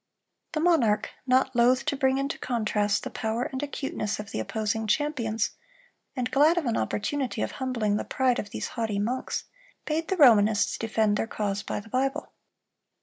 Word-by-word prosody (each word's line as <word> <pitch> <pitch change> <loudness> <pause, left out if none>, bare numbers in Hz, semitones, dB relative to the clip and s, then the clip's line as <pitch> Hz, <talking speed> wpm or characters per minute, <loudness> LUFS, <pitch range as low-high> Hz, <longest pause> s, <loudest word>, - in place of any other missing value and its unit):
The 310 - 0
monarch, 255 -11 +2 0.2
not 260 0 +3
loath 250 +3 +4
to 295 - 0
bring 265 -1 +2
into 275 +1 -2
contrast 215 -4 0
the - - -5
power 220 +2 -2
and 260 +1 -4
acuteness 275 -7 -3
of 210 -1 -7
the - - -3
opposing 220 - -2
champions, 230 -5 0 0.6
and 250 -2 -2
glad 300 +5 +4
of 335 - 0
an 235 -2 0
opportunity 255 +2 -1
of - - -3
humbling 230 -6 -1
the - - -2
pride 255 -1 +1
of 205 - -5
these - - -4
haughty 225 -4 -2
monks, 235 +6 -2 0.4
bade 320 +1 -1
the 380 - -1
Romanists 220 - +5
defend 215 -2 +1
their - - -1
cause 205 -2 -2
by - - -4
the 205 - -12
Bible. 265 +3 -1
240 Hz, 175 wpm, -27 LUFS, 215-270 Hz, 0.6 s, Romanists